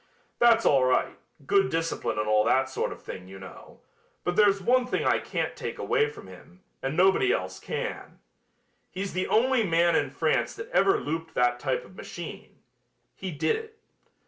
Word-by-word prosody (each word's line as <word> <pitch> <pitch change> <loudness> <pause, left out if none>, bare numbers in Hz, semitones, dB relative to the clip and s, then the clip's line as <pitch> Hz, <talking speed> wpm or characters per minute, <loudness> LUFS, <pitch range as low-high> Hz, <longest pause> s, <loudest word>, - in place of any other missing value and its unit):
That's 230 -1 +5
all 135 -2 +4
right, 130 0 +1 0.3
good 195 +6 +3
discipline 165 - -2
and 105 0 -1
all 105 0 +4
that 130 0 +3
sort 130 - -2
of - - -10
thing, 90 0 -8
you 95 +1 -10
know, 95 0 -13 0.4
but 175 - -1
there's 200 -1 +4
one 245 +6 +2
thing - - -1
I - - +3
can't - - -3
take - - -5
away 440 -1 +1
from 425 -2 -12
him, 180 +2 -15 0.2
and 135 +4 -3
nobody 190 - +4
else - - -2
can. - - -5 0.7
He's 195 +1 -5
the 185 +1 -1
only 255 +2 +3
man 170 -2 +3
in - - +1
France - - 0
that 460 +1 -8
ever 390 - +3
looped 160 +2 -5
that 120 0 +2
type 130 0 -2
of 185 - -17
machine. 175 -2 -9 0.5
He 190 +9 -6
did 160 -1 0
it. 445 0 -9
175 Hz, 180 wpm, -27 LUFS, -, 0.7 s, That's